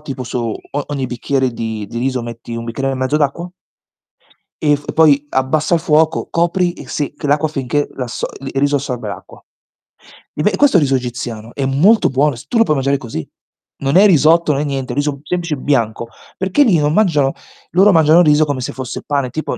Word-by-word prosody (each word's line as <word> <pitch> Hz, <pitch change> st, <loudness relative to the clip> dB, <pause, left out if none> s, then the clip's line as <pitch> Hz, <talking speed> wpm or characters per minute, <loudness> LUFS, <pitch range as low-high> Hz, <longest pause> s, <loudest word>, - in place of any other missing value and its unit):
tipo 135 Hz, -3 st, -6 dB
su 125 Hz, -, -4 dB, 0.2 s
o 145 Hz, 0 st, -6 dB
ogni 140 Hz, -3 st, -3 dB
bicchiere 130 Hz, +2 st, -1 dB
di 110 Hz, -2 st, -5 dB
di 115 Hz, -, -5 dB
riso 130 Hz, 0 st, -1 dB
metti 115 Hz, 0 st, -8 dB
1 115 Hz, -, -5 dB
bicchiere 135 Hz, +4 st, -3 dB
e -, -, -2 dB
mezzo 130 Hz, +3 st, 0 dB
d'acqua 155 Hz, +4 st, -1 dB, 1.1 s
e 150 Hz, -1 st, +2 dB
f 145 Hz, 0 st, -7 dB
poi 150 Hz, -3 st, +4 dB
abbassa 150 Hz, +5 st, +1 dB
il 165 Hz, -, +1 dB
fuoco, 160 Hz, -1 st, +2 dB
copri 175 Hz, +1 st, +1 dB
e -, -, -12 dB
sì 145 Hz, -2 st, -3 dB
che -, -, -5 dB
l'acqua 150 Hz, +2 st, +2 dB
finché 145 Hz, 0 st, -2 dB
l'asso 125 Hz, -2 st, -4 dB
il 135 Hz, 0 st, -7 dB
riso 145 Hz, +1 st, +2 dB
assorbe 125 Hz, -5 st, -5 dB
l'acqua. 100 Hz, -, -10 dB, 0.9 s
E -, -, -2 dB
ve 210 Hz, -, +2 dB
questo 285 Hz, -9 st, +4 dB
è -, -, +5 dB
riso 135 Hz, -2 st, +1 dB
egiziano, 120 Hz, -3 st, -5 dB
è 135 Hz, -, -2 dB
molto 170 Hz, +12 st, +3 dB
buono, 140 Hz, +2 st, +1 dB
s 115 Hz, -, -12 dB
tu 240 Hz, -, -1 dB
lo 230 Hz, -, +6 dB
puoi 155 Hz, -, 0 dB
mangiare 135 Hz, +1 st, +1 dB
così. 115 Hz, -, -6 dB, 0.5 s
Non 140 Hz, +5 st, +2 dB
è 200 Hz, -, +7 dB
risotto, 165 Hz, -3 st, +4 dB
non 140 Hz, -, -1 dB
è -, -, -1 dB
niente, 135 Hz, -3 st, -3 dB
riso 145 Hz, +1 st, -1 dB
semplice 170 Hz, -1 st, -2 dB
bianco 115 Hz, -4 st, -1 dB, 0.3 s
perché 190 Hz, +9 st, +2 dB
lì 210 Hz, -10 st, +3 dB
non 150 Hz, 0 st, +1 dB
mangiano 155 Hz, -9 st, +2 dB, 0.4 s
loro 195 Hz, +4 st, +5 dB
mangiano 160 Hz, 0 st, +5 dB
riso 155 Hz, -2 st, +4 dB
come 145 Hz, -3 st, -3 dB
se 125 Hz, -, -4 dB
fosse 130 Hz, -2 st, -6 dB
pane, 140 Hz, -3 st, -1 dB
tipo, 155 Hz, -, -4 dB
145 Hz, 205 wpm, -17 LUFS, 130-155 Hz, 1.1 s, è